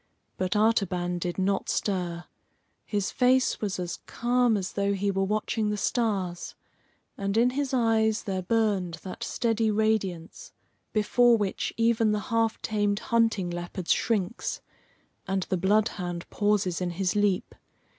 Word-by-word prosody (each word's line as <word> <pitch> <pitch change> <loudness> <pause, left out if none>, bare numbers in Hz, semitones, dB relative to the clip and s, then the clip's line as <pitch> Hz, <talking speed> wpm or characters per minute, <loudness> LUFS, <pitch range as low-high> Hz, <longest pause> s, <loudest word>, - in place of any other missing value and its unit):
But 185 +2 -1
Artaban 185 -5 +1
did 175 0 -3
not 195 +1 0
stir. 175 -4 -1 0.6
His 205 -2 -1
face 255 +1 +2
was 200 -3 -2
as 175 -1 -4
calm 240 -2 +2
as 190 -2 -4
though 200 0 0
he 200 +1 0
were 195 0 0
watching 215 +1 -1
the 210 - -1
stars, 195 -6 -1 0.6
and 200 +1 -1
in 240 +2 +4
his 275 +1 -2
eyes 225 -3 +2
there 190 -3 -2
burned 195 -4 0
that 185 - -6
steady 225 -1 0
radiance 215 - -1 0.4
before 235 +3 +4
which 205 -3 -2
even 230 -1 +3
the 210 - 0
half 225 -1 +1
tamed 205 -2 0 0.2
hunting 225 -6 +2
leopard 175 +1 -6
shrinks, 220 -1 0 0.7
and 190 -1 0
the 185 - +2
bloodhound 190 -2 0
pauses 205 -4 +1
in 180 - 0
his 180 +2 -1
leap. 205 -3 +1
205 Hz, 140 wpm, -27 LUFS, 185-225 Hz, 0.7 s, in